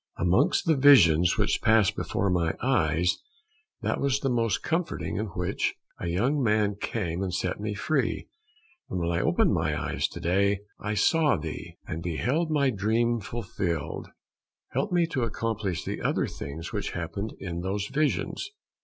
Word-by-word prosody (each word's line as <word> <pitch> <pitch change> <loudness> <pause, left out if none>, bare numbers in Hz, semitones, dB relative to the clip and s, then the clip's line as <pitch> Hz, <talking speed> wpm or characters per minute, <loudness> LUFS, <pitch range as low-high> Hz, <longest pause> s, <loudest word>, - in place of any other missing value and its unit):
Amongst 105 - +2
the 165 -2 +4
visions 90 - +6
which - - +1
passed 110 -3 +4
before 100 -1 -1
my 85 -2 +1
eyes, 90 - +1 0.6
that - - 0
was 140 -1 +2
the 135 -2 0
most 115 -3 +1
comforting 165 +1 -2
in 110 +2 -1
which 90 -1 -2 0.2
a - - -4
young 125 - +1
man 105 -3 +2
came 95 -4 -3
and 95 -2 -2
set 90 +1 -2
me 105 0 -3
free, 125 0 -1 0.6
and - - -3
when 85 0 0
I 85 - +1
opened - - +3
my - - 0
eyes - - -1
to - - -9
day 100 +3 +2 0.2
I 105 +1 -2
saw 150 - +3
thee, 80 0 -7
and 80 - -5
beheld 125 - 0
my 140 -4 +2
dream 115 +3 +1
fulfilled. 95 -8 -3 0.6
Help - - -1
me 175 -1 +3
to 155 -6 -2
accomplish 110 -6 -2
the - - -4
other - - +1
things 80 +4 -7
which - - -3
happened 100 +6 -4
in 85 -3 -4
those 100 +2 -2
visions. 150 - -1
105 Hz, 160 wpm, -27 LUFS, 90-130 Hz, 0.6 s, visions